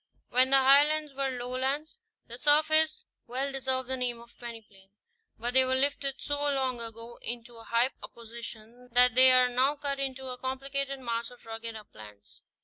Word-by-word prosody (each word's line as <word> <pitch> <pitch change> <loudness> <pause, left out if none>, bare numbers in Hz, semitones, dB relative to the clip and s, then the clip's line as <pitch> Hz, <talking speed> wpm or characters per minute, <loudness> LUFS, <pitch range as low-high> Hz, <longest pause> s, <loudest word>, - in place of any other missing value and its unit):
When 255 +1 +4
the 270 - +6
Highlands 290 +3 +4
were 275 0 -2
lowlands, 260 - -3 0.3
their 240 +2 -9
surface 310 +2 +3 0.2
well 265 +3 -2
deserved 260 -1 -1
the 260 - -1
name 245 -2 -3
of 235 0 -17
peneplain; 215 -5 -11 0.5
but 240 +2 -2
they 260 0 +6
were 260 0 +1
lifted 275 0 0
so 290 0 -1
long 265 -4 0
ago 230 +1 -8
into 240 0 -6
so 230 - -13
high 235 +3 +1
a - - -6
position 235 +1 -11
that 250 0 +6
they 255 +1 +8
are 255 0 +5
now 255 +4 +1
cut 280 -1 -4
into 265 -1 -4
a 250 0 -5
complicated 275 +1 -4
mass 235 -2 -3
of 245 -1 -17
rugged 225 0 -7
uplands. 105 - -14
255 Hz, 175 wpm, -28 LUFS, 235-275 Hz, 0.5 s, they